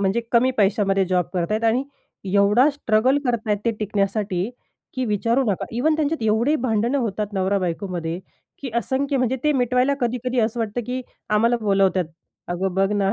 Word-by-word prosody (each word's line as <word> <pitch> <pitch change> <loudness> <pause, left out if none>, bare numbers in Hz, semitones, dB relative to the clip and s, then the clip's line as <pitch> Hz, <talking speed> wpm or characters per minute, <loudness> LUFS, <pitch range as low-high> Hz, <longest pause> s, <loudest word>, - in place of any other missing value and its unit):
म्हणजे 200 +4 +1
कमी 245 +2 +4
पैशामध्ये 195 -1 +2
जॉब 180 -1 +1
करताय 180 +5 0
आणि 250 +5 +1 0.5
एवढा 205 +8 +5
स्ट्रगल 260 0 +2
करत 245 -2 +1
आहेत 210 -1 +1
ते 230 - +3
टिकण्यासाठी, 200 -1 -1 0.4
की 255 -1 -1
विचारू 230 +4 +1
नका. 190 - -2
इव्हन 310 +6 +2
त्यांच्यात 310 -2 -1
एवढे 230 +8 +2
भांडणं 235 +4 +1
होतात 210 -3 -2
नवरा-बायकोमध्ये 185 -3 -2 0.4
की 265 -3 -6
असंख्य 270 +4 0
म्हणजे 255 0 +1
ते 300 - +4
मिटवायला 250 +1 +2
कधी-कधी 250 0 0
असं 225 +2 0
वाटतं 225 +1 -2
की 250 +1 -2 0.3
आम्हाला 230 +3 +3
बोलावतात. 195 -3 +2 0.4
"अगं 180 +1 -2
बघ 195 +1 +2
ना 200 -1 +1
220 Hz, 160 wpm, -22 LUFS, 195-250 Hz, 0.5 s, एवढा